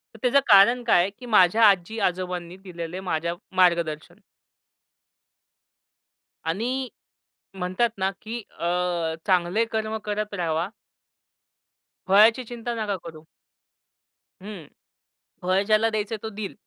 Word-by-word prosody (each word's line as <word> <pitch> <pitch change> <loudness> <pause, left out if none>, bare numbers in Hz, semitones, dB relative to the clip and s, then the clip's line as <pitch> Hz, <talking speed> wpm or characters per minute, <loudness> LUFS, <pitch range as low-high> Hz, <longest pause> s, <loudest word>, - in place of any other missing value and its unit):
तर - - -13
त्याचं 255 +2 +4
कारण 225 +4 +6
काय 225 -7 +4
आहे, 185 - 0
की 250 - -10
माझ्या 215 -1 +4
आजी-आजोबांनी 180 -2 -2
दिलेलं 180 -1 -7
माझ्या 170 -2 -2 0.2
मार्गदर्शन. 170 -4 +1 2.3
आणि 250 +8 -2 0.6
म्हणतात 185 +5 -1
ना 190 0 0
की 225 +2 -5 0.2
अ, 175 -1 -1
चांगले 185 +4 +2
कर्म 220 0 -2
करत 210 0 -3
राहावा. 170 -1 -1 1.4
फळाची 220 +6 +5
चिंता 240 0 -4
नका 205 -2 -2
करू. 160 -2 -10 1.2
हं, 195 -7 -9 0.7
फळ 185 +2 +1
ज्याला 220 +1 +3
द्यायचंय 215 +1 -2
तो 220 - -4
देईल. 205 -2 -6
195 Hz, 110 wpm, -24 LUFS, 175-220 Hz, 2.3 s, कारण